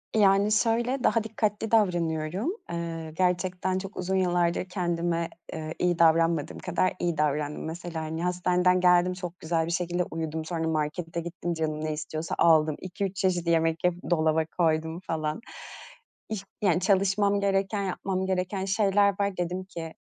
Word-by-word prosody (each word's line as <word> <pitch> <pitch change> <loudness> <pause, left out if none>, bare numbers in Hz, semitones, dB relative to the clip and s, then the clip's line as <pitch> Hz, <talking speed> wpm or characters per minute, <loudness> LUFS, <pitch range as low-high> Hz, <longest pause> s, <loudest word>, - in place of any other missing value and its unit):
Yani, 200 0 +4
şöyle 240 +4 +1
daha 230 -2 +3
dikkatli 215 0 -2
davranıyorum. 175 - +1 0.2
Eee, 165 -2 -4
gerçekten 185 0 0
çok 195 +2 -6
uzun 185 +1 -1
yıllardır 175 -1 +1
kendime, 170 -2 -1 0.2
eee, 155 0 -5
iyi 175 -1 +1
davranmadığım 165 -1 +3
kadar 180 +1 0
iyi 170 -3 -1
davrandım. 150 0 0
Mesela, 165 0 -5
hani, 160 +2 -4
hastaneden 180 0 +2
geldim, 180 0 +4
çok 180 -1 -7
güzel 160 0 0
bir 170 - -4
şekilde 175 0 0
uyudum. 160 -1 -3
Sonra 165 -1 -2
markete 160 +2 -2
gittim, 175 0 -4
canım 155 -1 -2
ne 155 - -1
istiyorsa 155 +1 -4
aldım, 155 -2 +4
2-3 190 +1 -4
çeşit 180 -3 0
yemek 165 0 +2
yapıp 180 0 -1
dolaba 160 -1 +2
koydum, 160 0 +1
falan. 155 0 -3 0.9
Y 215 - -1 0.2
yani, 180 -4 +3
çalışmam 200 +1 +2
gereken, 200 +1 0
yapmam 190 0 -2
gereken 190 +1 -1
şeyler 200 0 +3
var. 200 -2 0
Dedim 180 +1 -2
ki, 165 -3 -7
175 Hz, 150 wpm, -27 LUFS, 160-190 Hz, 0.9 s, Yani